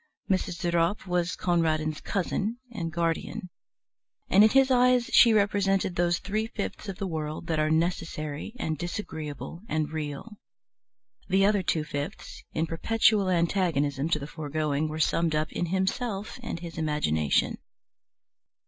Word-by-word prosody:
Mrs. 185 -3 0
De 175 -2 0
Ropp 170 +4 +1
was 180 -1 0
Conradin's 155 -3 0
cousin 205 +4 -1
and 170 -8 -4
guardian, 170 +2 -2 0.8
and 200 - +7
in 215 - +7
his 270 +2 +4
eyes 250 -1 +4
she 235 - +8
represented 200 -3 +2
those 175 0 +2
three 215 +4 -2
fifths 210 -1 -5
of 190 - -5
the 195 - -3
world 155 -3 -4
that 160 -2 -1
are 155 0 +2
necessary 160 +1 -2
and 155 - -2
disagreeable 160 - -5
and 155 -1 -1
real; 155 +7 -5 0.9
the 195 +1 +4
other 205 -1 +3
two 165 -3 0
fifths, 145 -2 -6
in 160 - 0
perpetual 205 +4 +2
antagonism 165 -5 +1
to 165 - +2
the 140 - -6
foregoing, 150 0 -2
were 155 0 -5
summed 165 0 +2
up 155 0 0
in 175 - -2
himself 195 +5 -2
and 230 -8 -5
his 165 -2 -7
imagination. 140 - +1
170 Hz, 145 wpm, -27 LUFS, 155-195 Hz, 0.9 s, she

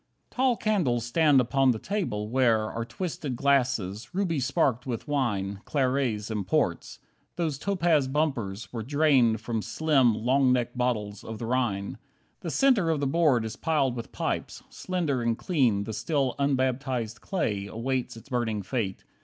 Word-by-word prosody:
3 - - -23
Tall 255 -2 +2
candles 155 - +1
stand 145 +2 +4
upon 135 +2 +2
the 120 - +2
table, 110 - -3
where 115 -3 +2
Are 115 - -3
twisted 150 - -4
glasses, 125 - 0
ruby 180 -6 0
sparked 130 -2 0
with 120 +3 -4
wine, 100 -9 -1
Clarets 130 -6 0
and 105 -4 -3
ports. - - 0 0.4
Those 160 -5 -2
topaz 170 -7 +2
bumpers 130 -9 -2
were 115 - -3
Drained 130 -4 +3
from 115 -1 -2
slim, 135 -5 +2
long 130 +4 +2
necked 120 -1 0
bottles 110 -5 -2
of 110 0 -6
the 115 - -5
Rhine. 115 -5 -1 0.4
The 170 - -5
centre 230 - +3
of 160 -2 +1
the 140 - 0
board 140 -5 +2
is 110 - -5
piled 145 -6 0
with 115 - -7
pipes, - - -3
Slender 165 -9 -2
and 115 -1 0
clean, 125 - +1
the 110 - -5
still 140 +1 0
unbaptized 130 -4 -1
clay 105 - -2
Awaits 125 +3 -3
its 115 - -14
burning 115 -5 -1
fate. 100 -1 -3
130 Hz, 160 wpm, -27 LUFS, 115-150 Hz, 0.4 s, stand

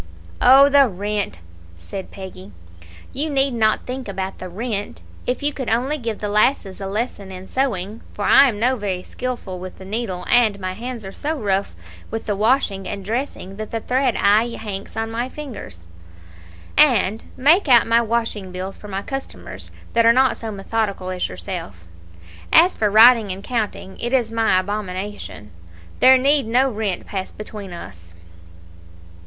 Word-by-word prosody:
"Oh, 270 +3 +8
the 280 -2 +5
rent!" 205 - -3 0.3
said 85 - -8
Peggy; 185 - -10 0.6
"you 300 +4 -1
need 275 -2 +2
not 220 -2 +1
think 255 0 -5
about 190 -1 -4
the 185 - -6
rent, 205 +2 -4 0.2
if 250 +3 -1
you 290 0 +1
could 260 -4 -4
only 260 +7 0
give 225 -4 -3
the 210 - -4
lasses 205 -2 +1
a 195 - -3
lesson 205 -1 -4
in 185 0 -9
sewing 220 -6 -2
(for 205 - -3
I'm 245 -7 +6
no 250 +4 +2
very 190 -4 -3
skilful 240 -7 -5
with 185 0 -8
the 190 - -11
needle, 195 -3 -4
and 220 -5 +3
my 185 -1 -3
hands 235 +1 -6
are 190 - -6
so 310 +9 -3
rough 200 - -1 0.3
with 225 - -5
the 205 - -1
washing 210 -3 +1
and 200 -2 -5
dressing 220 -4 -4
that 215 0 -5
the 225 - -3
thread 255 +1 0
aye 215 +4 +3
hanks 200 -2 -7
on 225 0 -2
my 240 +3 -2
fingers), 240 - -9 0.9
and 235 -8 +4
make 315 +8 +4
out 240 -3 +6
my 230 +1 +4
washing 225 -4 -2
bills 185 +2 -6
for 210 - -11
my 195 0 -4
Customers 270 +3 -7 0.2
that 230 - +4
are 230 - +7
not 260 +1 +3
so 225 -1 -6
methodical 200 -2 -2
as 180 -1 -2
yourself. 165 - -7 0.7
As 350 +3 +6
for 210 - +1
writing 220 0 +7
and 190 +2 -6
counting, 215 -5 -3
it 240 +2 -3
is 240 -4 +2
my 225 -5 +3
abomination. 190 - -5 0.5
There 260 0 +8
need 275 -1 +2
no 255 +4 +3
rent 210 -4 -3
pass 190 -2 -5
between 210 -2 -8
us." 85 - -11
215 Hz, 170 wpm, -21 LUFS, 195-250 Hz, 0.9 s, Oh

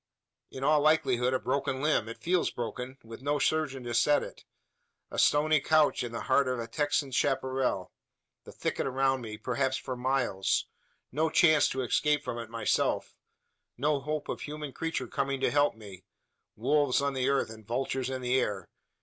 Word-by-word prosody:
In 135 - -7
all 150 +1 +4
likelihood 135 -5 +3
a 130 - +1
broken 130 0 -1
limb 145 -6 +1
it 115 - -7
feels 180 +1 +1
broken 125 +2 -5
with 115 +1 -10
no 145 +2 0
surgeon 145 -4 0
to 120 0 -4
set 145 +5 +3
it; - - -10 0.7
a - - -3
stony 155 +1 +4
couch 155 0 +3
in 120 - -5
the 115 - -4
heart 135 0 +2
of 130 0 -1
a 115 - -3
Texan 145 +1 -1
chapparal 130 -6 0 0.5
the - - -11
thicket - - -2
around 135 0 +1
me, 110 -2 -7
perhaps 130 +3 -1
for 130 - -5
miles 125 -6 0 0.5
no 155 +4 +1
chance 155 -2 +5
to 130 0 -2
escape 150 +4 +1
from 120 - -4
it 115 - -5
of - - -21
myself 115 -2 0 0.6
no 145 +3 +1
hope 150 +2 -3
of - - -4
human 150 -2 -6
creature 165 -5 -3
coming 135 +3 -2
to - - +1
help 145 -2 +3
me 100 -4 -12 0.5
wolves 140 +3 +2
on 140 0 0
the 130 0 0
earth, 140 -5 +1
and 110 -2 -12
vultures 130 +1 -2
in 130 -1 -4
the 125 +1 +2
air! 105 -6 -3
130 Hz, 185 wpm, -29 LUFS, 120-145 Hz, 0.7 s, chance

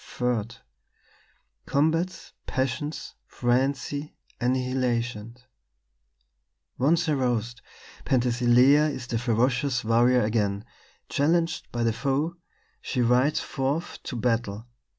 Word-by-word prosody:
"III 120 -4 0 1.2
"COMBATS, 165 +5 0
PASSIONS, 135 +3 -3
FRENZY, 135 +4 -1 0.3
ANNIHILATION 120 -3 -1 1.4
"Once 165 +6 +2
aroused, 125 -5 -1 0.4
Penthesilea 125 +4 +4
is 130 -4 -5
the 115 -2 -2
ferocious 125 +2 +1
warrior 120 +2 +4
again; 105 -1 0 0.4
challenged 165 +3 0
by 120 -1 -2
the 115 -1 +2
foe, 140 +7 -1 0.5
she 130 - -3
rides 125 +5 +3
forth 140 +5 -3
to 135 - -6
battle. 115 -2 -1
125 Hz, 90 wpm, -26 LUFS, 120-145 Hz, 1.4 s, Penthesilea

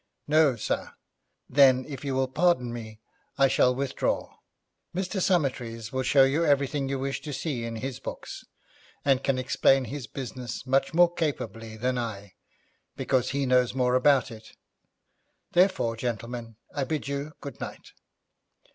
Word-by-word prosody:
'No, 150 -3 +4
sir.' 110 - -3 0.5
'Then, 130 -1 +5
if 140 -3 -7
you 135 -2 -2
will 130 0 +1
pardon 130 -4 +1
me, 110 -2 -8 0.4
I 135 -1 +5
shall 125 -1 +3
withdraw. 135 0 -1 0.6
Mr. 190 +1 -2
Summertrees 125 - 0
will 130 - 0
show 135 +1 +5
you 140 +5 +2
everything 140 -2 +1
you 135 - -1
wish 135 +1 -3
to 150 - -6
see 135 -5 -3
in 115 0 -4
his 130 +3 -5
books, - - -7 0.6
and 135 -2 +3
can 135 -2 +1
explain 130 +1 +3
his 130 +1 -6
business 125 -2 -6
much 135 +3 +1
more 175 0 +5
capably 115 -9 -3
than 125 +2 0
I, 100 -5 -5 0.6
because 130 -1 +1
he 140 0 0
knows 125 -1 +3
more 125 -1 +2
about 130 -1 +4
it; 110 -1 -12 1.0
therefore, 175 -11 +3
gentlemen, 115 0 -4 0.2
I 145 - -1
bid 150 +1 -3
you 140 +2 -4
good 140 - -8
night.' - - -8
130 Hz, 150 wpm, -27 LUFS, 120-140 Hz, 1.0 s, Then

